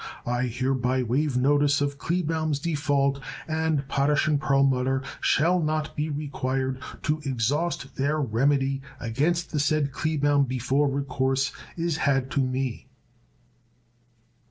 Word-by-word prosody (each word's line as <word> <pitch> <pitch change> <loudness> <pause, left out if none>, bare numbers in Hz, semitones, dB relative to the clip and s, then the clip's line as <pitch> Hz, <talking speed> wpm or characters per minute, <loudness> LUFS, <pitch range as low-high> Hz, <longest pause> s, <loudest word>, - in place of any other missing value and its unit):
I 125 +1 0
hereby 130 +1 0
waive 130 +3 0
notice 145 +2 +3
of 140 0 -2
Kleebaum's 160 -3 0
default 145 -3 0 0.3
and 160 -3 0
Potash 140 +2 +2
& - - +3
Perlmutter 135 -2 +2 0.2
shall 175 +4 +3
not 155 0 -1
be 150 +1 -1
required 135 -3 -2 0.2
to 150 0 0
exhaust 135 +4 -1
their 145 +3 +1
remedy 135 +2 +1 0.2
against 155 +9 0
the 150 - 0
said 150 -1 +1
Kleebaum 145 -1 +1
before 130 +3 +1
recourse 135 -1 0 0.3
is 165 -2 0
had 135 -4 +1
to - - 0
me. 130 -1 -2
140 Hz, 120 wpm, -26 LUFS, 130-150 Hz, 0.3 s, notice